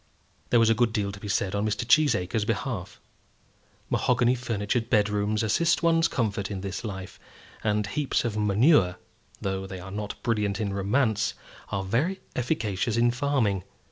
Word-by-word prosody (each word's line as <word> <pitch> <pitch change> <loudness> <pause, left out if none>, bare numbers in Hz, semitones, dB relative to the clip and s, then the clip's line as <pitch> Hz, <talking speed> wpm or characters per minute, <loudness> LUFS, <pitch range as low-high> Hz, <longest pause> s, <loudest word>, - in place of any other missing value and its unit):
There 120 - +5
was 115 0 +5
a - - +6
good 115 0 +1
deal 100 -2 -1
to 100 - -10
be 105 - -7
said 95 -1 0
on 100 0 0
Mr. 110 +2 -1
Cheesacre's 115 - +3
behalf. 110 -2 -3 0.9
Mahogany 120 +1 +3
furnitured 115 -1 -2
bedrooms 105 0 +1
assist 170 +11 +2
one's 165 0 +4
comfort 100 -5 -1
in 100 -2 -4
this 100 +1 -5
life; 95 -4 -7 0.4
and 105 -1 +1
heaps 135 +5 -1
of 115 -3 -2
manure, 105 - +4 0.5
though 95 0 -2
they 95 -1 -7
are 95 +1 -9
not 105 +1 -4
brilliant 105 -3 0
in 100 -3 -2
romance, 105 +2 +1 0.3
are 100 -1 -2
very 140 - 0 0.2
efficacious 110 -3 -1
in 120 0 +4
farming. 120 -8 0
105 Hz, 160 wpm, -26 LUFS, 100-120 Hz, 0.9 s, a